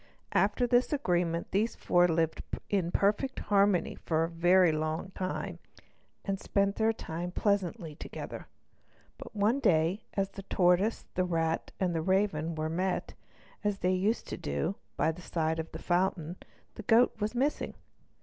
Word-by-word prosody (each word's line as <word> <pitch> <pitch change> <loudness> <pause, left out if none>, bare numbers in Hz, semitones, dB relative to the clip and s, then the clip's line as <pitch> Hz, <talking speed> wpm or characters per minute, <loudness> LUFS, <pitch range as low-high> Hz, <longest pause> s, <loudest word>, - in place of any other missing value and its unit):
After 250 - +3
this 245 +1 +3
agreement 175 - 0
these 215 +4 +1
four 175 0 +3
friends 165 -1 0
lived 165 -1 +1 0.3
in 190 -4 +1
perfect 210 +9 +1
harmony 200 -3 +2
for 160 -1 -1
a 165 - -1
very 175 +1 +5
long 155 +4 -2
time, 185 -1 -4 0.7
and 195 -1 -1
spent 200 0 0
their 220 0 +3
time 175 -5 -5
pleasantly 190 -3 -1
together. - - -8 0.7
But - - -10
one 215 +6 +2
day, 170 - +2
as 195 -1 0
the 195 - -8
tortoise, 185 +3 +2
the 185 - +1
rat, 165 -2 -1
and 180 -2 +1
the 165 - 0
raven 170 -3 +1
were 155 0 -2
met, 180 +3 -1 0.5
as 205 -1 0
they 185 -1 +1
used 200 +5 0
to - - -4
do, 70 -1 -2 0.2
by 160 - +2
the 170 +3 -10
side 160 -1 -1
of 160 - -5
the - - -6
fountain, 175 -1 0 0.4
the - - -8
goat 225 +4 +4
was 215 +2 -2
missing. 275 +5 0
185 Hz, 160 wpm, -30 LUFS, 165-205 Hz, 0.7 s, very